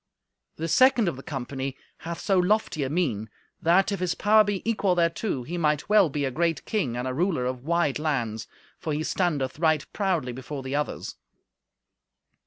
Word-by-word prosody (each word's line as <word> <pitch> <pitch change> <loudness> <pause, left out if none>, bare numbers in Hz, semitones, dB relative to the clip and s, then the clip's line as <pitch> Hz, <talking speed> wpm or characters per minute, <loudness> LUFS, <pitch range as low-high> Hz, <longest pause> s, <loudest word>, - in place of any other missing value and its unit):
The 165 - -3
second 250 +2 +5
of 170 - -1
the 135 - -9
company 135 -2 -5 0.2
hath 170 0 -6
so 195 -2 +2
lofty 185 -4 +1
a 130 - -2
mien 130 - -1 0.3
that, 190 +6 +3
if 200 - -2
his 180 -2 0
power 215 +1 +5
be 205 0 -3
equal 205 -5 +2
thereto, 170 - 0
he 175 +8 -4
might 150 +2 0
well 210 -5 +5
be 145 0 -1
a 135 - -1
great 165 +2 0
king 160 - -1
and 125 +1 -2
a 130 - -2
ruler 160 -3 0
of 130 0 -4
wide 170 -4 +1
lands, 120 -8 -2 0.3
for 155 - -3
he 150 +2 -1
standeth 155 -7 -1
right 155 -3 +2
proudly 180 -11 0
before 130 +2 -6
the 130 +1 -3
others. 150 0 -3
160 Hz, 185 wpm, -26 LUFS, 135-185 Hz, 0.3 s, second